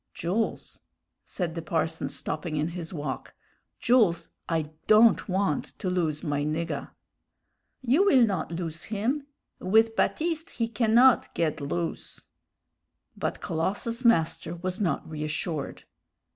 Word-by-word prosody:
"Jools," 195 +7 -2 0.5
said 175 -4 -3
the 165 - -4
parson, 160 -2 -1
stopping 155 +3 -4
in 150 +2 0
his 170 -1 -6
walk 145 -6 -5 0.4
"Jools, 225 -9 +3 0.2
I 160 -2 -1 0.2
don't 215 0 +5
want 190 -5 -1
to 185 - -2
lose 160 -4 -1
my 145 -3 -1
niggah." 155 +3 -2 0.9
"You 275 +11 +4
will 265 -11 +6
not 190 -6 -2
loose 165 -1 -4
him. 245 +7 -2 0.3
With 225 +4 +3
Baptiste 325 +4 0
he 230 -1 -2
cannot 230 +3 +4
ged 155 -2 0
loose." 165 +4 -4 0.9
But - - -3
Colossus's 205 +9 -2
master 165 -6 +2
was 185 +3 -4
not 180 - 0
reassured. 155 -1 -4
175 Hz, 120 wpm, -27 LUFS, 160-225 Hz, 0.9 s, will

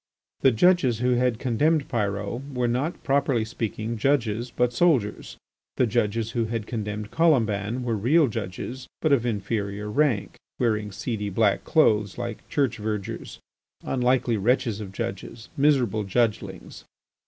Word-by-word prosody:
The 135 - +5
judges 130 -1 +3
who 125 +2 +1
had 125 -1 +2
condemned 140 +5 +1
Pyrot 105 +5 -3
were 125 -1 +1
not, 130 +8 -2
properly 135 -5 +1
speaking, 115 0 -4
judges 120 -3 +1
but 125 0 0
soldiers. 130 -9 +1 0.4
The 125 - +4
judges 110 0 0
who 115 -1 0
had 110 -1 -3
condemned 105 -2 -4
Colomban 120 - +1
were 120 -2 0
real 140 +9 +3
judges, 115 +4 -5
but 155 - +1
of 120 -3 +2
inferior 105 -1 -2
rank, 135 -5 +1 0.2
wearing 105 -4 0
seedy 105 0 -3
black 100 +1 +1
clothes 105 - +3
like 120 -2 -6
church 135 -4 0
vergers, 105 -2 -4 0.4
unlucky 125 -2 +1
wretches 115 0 +1
of 100 -2 -7
judges, 115 +1 -6
miserable 135 -7 +2
judgelings. 110 +2 -2
115 Hz, 135 wpm, -25 LUFS, 105-130 Hz, 0.4 s, The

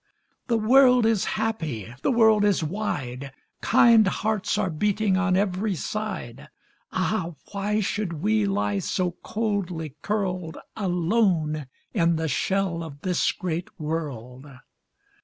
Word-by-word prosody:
The 235 -2 +2
world 250 +2 +5
is 220 -3 +2
happy, 160 - -3
the - - +1
world 220 -4 +5
is 200 -5 +2
wide, 140 -8 -3 0.3
Kind 230 -3 +5
hearts 215 +1 -1
are 185 - 0
beating 205 +4 +1
on 190 -1 +2
every 195 +1 0
side; 195 - -5 0.4
Ah, 185 -3 -1 0.2
why 205 +2 0
should 200 -2 -2
we 110 -9 +1
lie 100 0 0
so 180 - -1
coldly 190 - -2
curled 185 -6 -2 0.2
Alone 175 - +1 0.3
in 170 -5 +2
the 160 0 -1
shell 185 +3 0
of 145 -3 -10
this 180 -1 +1
great 175 -2 -4
world? 145 -5 -5
185 Hz, 120 wpm, -25 LUFS, 155-215 Hz, 0.4 s, world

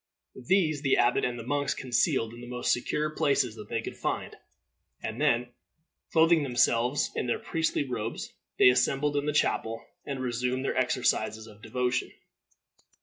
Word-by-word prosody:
These 160 -7 +2
the 135 -3 +2
abbot 120 +1 +3
and 120 -1 -1
the 115 - -7
monks 140 +2 0
concealed 120 -2 0
in 120 - -10
the 120 - -9
most 125 0 -1
secure 150 +5 -1
places 140 -6 +1
that 105 -2 -11
they 115 -1 -2
could - - -6
find, - - -3 0.7
and - - -4
then, 120 +1 +2 0.6
clothing 165 0 +5
themselves 125 0 +2
in - - -1
their 120 - +1
priestly 160 -2 -1
robes, 115 -3 -4 0.2
they - - +8
assembled 140 +3 +2
in 145 +1 0
the - - +2
chapel, 115 -5 0 0.2
and 140 -2 -5
resumed 125 +1 -1
their - - -1
exercises 120 -3 0
of 105 -2 -15
devotion. 125 +3 -1
125 Hz, 160 wpm, -28 LUFS, 120-145 Hz, 0.7 s, they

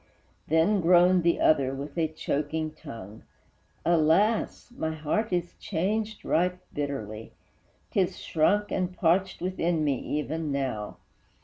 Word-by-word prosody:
Then 165 +6 +3
groaned 180 +1 +5
the 170 0 +2
other, 135 -3 +3
with 140 +1 -7
a 165 -2 +1
choking 155 0 -2
tongue, 115 -9 -10 0.6
"Alas! 175 +9 +2
my 160 -5 -2
heart 160 +9 -1
is 175 -1 -1
changed 210 +5 -2
right 180 +2 +1 0.2
bitterly; 115 -7 -4 0.6
'Tis 190 -3 +1
shrunk 205 +6 +1
and 185 0 -2
parched 185 +2 +1
within 175 -3 0
me 140 -4 +1
even 150 +1 -3
now!" 130 -7 -3
160 Hz, 120 wpm, -27 LUFS, 145-180 Hz, 0.6 s, groaned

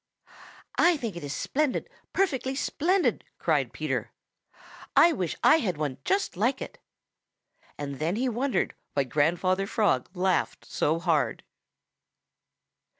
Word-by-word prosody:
"I 345 -1 +5
think 230 -9 -4
it 170 - -7
is 145 - -4
splendid, 295 -1 -1 0.2
perfectly 270 -8 0
splendid," 355 +7 +1
cried - - +1
Peter. - - -3 0.8
"I 340 - +7
wish 180 - -2
I - - +7
had 190 - -1
one 145 -4 -3
just 390 +1 0
like 240 +8 +1
it." - - -8 1.0
And 140 -2 -5
then 165 +5 0
he 255 +4 0
wondered 250 +3 0 0.2
why 140 - +3
Grandfather 175 +8 +1
Frog 205 - +1
laughed 185 0 0
so 155 +2 0
hard. 165 -4 0
195 Hz, 125 wpm, -27 LUFS, -, 1.0 s, I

